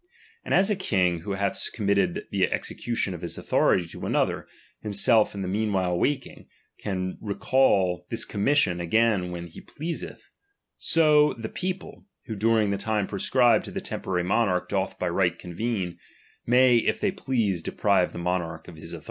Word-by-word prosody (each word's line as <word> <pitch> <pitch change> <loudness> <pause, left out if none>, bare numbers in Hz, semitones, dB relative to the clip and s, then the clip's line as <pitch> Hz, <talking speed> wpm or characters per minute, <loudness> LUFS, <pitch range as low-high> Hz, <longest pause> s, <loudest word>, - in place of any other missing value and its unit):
And - - -7
as 195 +3 +4
a - - +2
king 90 - +1
who 100 +4 -4
oa, 100 0 0
th - - -3
committed 100 -4 0
the - - +1
execution 115 -5 -2
of 85 - -8
his 85 - -5
authority 90 - +2
to - - -7
Another, - - 0 0.3
himself 105 +1 +3
in 100 - -4
the - - -3
meanwhile 95 -3 0
waking, 135 +8 -2 0.3
can 95 -2 -3
re 105 -2 -3
cal 95 -10 +2
this 115 -1 -1
commission 100 -5 +1
again 100 0 +2
when 85 -1 -5
he 85 - -12
pleaseth; 165 +3 -7 0.4
so 150 -2 +4
^^ - - -16
peojde, 180 - -5 0.2
who 110 - -5
during 110 0 +2
the 100 - 0
time 105 0 -1
prescribed 115 +3 +2
to - - -7
the - - -3
temporary 90 -2 -3
monarch 90 -1 +1
doth 95 -1 -1
by 90 - -2
right 90 -1 +1
convene, 90 0 -4 0.5
may 125 0 +5
if 115 - 0
tiiey 200 -2 0
please 115 - 0
deprive 95 +1 +1
the - - -9
monarch 85 -1 -3
of 85 - -11
his - - -9
authority. - - -6
100 Hz, 175 wpm, -26 LUFS, 90-115 Hz, 0.5 s, may